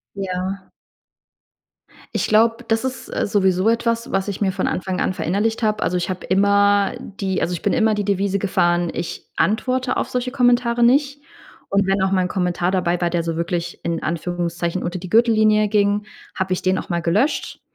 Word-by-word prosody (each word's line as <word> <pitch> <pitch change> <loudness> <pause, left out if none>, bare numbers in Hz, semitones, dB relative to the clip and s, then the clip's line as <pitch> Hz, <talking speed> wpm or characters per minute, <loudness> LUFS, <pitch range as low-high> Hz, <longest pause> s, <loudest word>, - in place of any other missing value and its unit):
Ja. 190 0 -4 1.4
Ich - - 0
glaube, 230 +3 +3
das 225 +2 +1
ist, 260 0 -4
äh, - - 0
sowieso 190 0 +2
etwas, 230 0 0
was 195 +1 -1
ich 200 - -4
mir 195 - +2
von 190 - -1
Anfang 185 0 -2
an - - 0
verinnerlicht 210 +7 -1
habe. 215 -1 0
Also, 180 - 0
ich 175 - -2
habe 185 -1 -5
immer 200 +1 +3
die 190 -1 -3
also, 180 - -1
ich 170 - -4
bin - - +1
immer 220 -2 +3
die 205 -1 -2
Devise 200 0 0
gefahren: 175 -3 +1
„Ich 170 - -5
antworte 255 +4 0
auf - - -1
solche 250 0 -2
Kommentare 245 -2 +2
nicht.” 280 +4 +3 0.5
Und 200 -1 +2
wenn 195 0 +1
auch 190 0 +1
mal 185 - +3
'n 180 - -1
Kommentar 180 -1 -1
dabei 180 -2 0
war, 175 -1 +1
der 170 0 0
so 165 -1 -3
wirklich 170 0 -3
in 170 -1 -2
Anführungszeichen 170 +1 -2
unter 175 +1 -3
die 180 0 -9
Gürtellinie 215 -2 +4
ging, 205 0 +1 0.3
habe 190 -1 -1
ich - - -5
den 185 0 +1
auch - - -6
mal 170 -2 -1
gelöscht. 210 - 0
195 Hz, 195 wpm, -21 LUFS, 180-220 Hz, 1.4 s, Gürtellinie